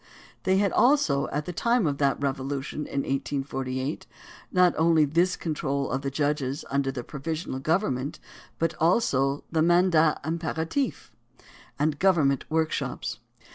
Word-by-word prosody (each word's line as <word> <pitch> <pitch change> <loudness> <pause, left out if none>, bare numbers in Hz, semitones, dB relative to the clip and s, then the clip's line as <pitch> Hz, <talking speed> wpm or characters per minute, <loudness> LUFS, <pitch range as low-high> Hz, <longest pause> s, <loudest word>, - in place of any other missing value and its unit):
They 190 0 +3
had 200 0 +2
also, 240 - +3
at 150 +1 -3
the 180 - -5
time 235 +4 +2
of 145 -2 -1
that 140 -1 +2
Revolution 140 +1 -3
in 140 - -1
1848, 135 0 -3 0.4
not 180 -1 +4
only 160 -1 +4
this 170 +5 +2
control 140 -4 -2
of 130 - -1
the 140 - -2
judges 145 0 -1
under 140 -1 +1
the 125 -2 -5
provisional 155 0 -4
government, 145 -3 -1 0.4
but 165 0 0
also 145 - +2
the 160 -1 +2
"mandat 170 -2 +4
imperatif" 165 - -2 0.7
and 150 0 0
government 155 -8 +3
workshops. 140 -6 -2
150 Hz, 135 wpm, -26 LUFS, 135-170 Hz, 0.7 s, not